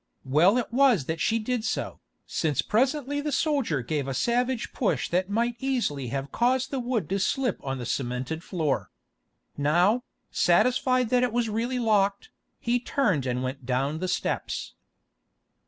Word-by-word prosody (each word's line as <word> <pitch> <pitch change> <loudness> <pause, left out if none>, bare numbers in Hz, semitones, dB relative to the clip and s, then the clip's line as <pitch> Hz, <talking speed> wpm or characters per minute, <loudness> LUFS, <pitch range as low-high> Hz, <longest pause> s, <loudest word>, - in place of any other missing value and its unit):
Well 160 - +4
it 240 -1 -2
was 250 - +4
that 160 +1 -3
she 225 - +2
did 230 +1 -2
so, 220 - -3 0.3
since 150 -5 0
presently 275 +4 +1
the 300 0 -2
soldier 275 - 0
gave 145 +2 -2
a 135 - -3
savage 245 - 0
push 230 - 0
that 180 +2 0
might 235 +3 0
easily 240 - -1
have 135 +2 -4
caused 260 +2 +1
the 270 - -1
wood 240 - -1
to 195 - 0
slip 255 +5 0
on 135 -1 -3
the 125 - -5
cemented 125 +6 -3
floor. 160 -8 -1 0.7
Now, 175 - +3 0.3
satisfied 255 -1 +3
that 250 0 +3
it 250 -2 +1
was 235 -1 0
really 235 +4 -1
locked, 205 -4 +1 0.3
he 240 +1 +1
turned 210 - 0
and 125 0 -1
went 130 +1 -4
down 135 +4 0
the 185 - -2
steps. 180 - -2
215 Hz, 160 wpm, -26 LUFS, -, 0.7 s, Well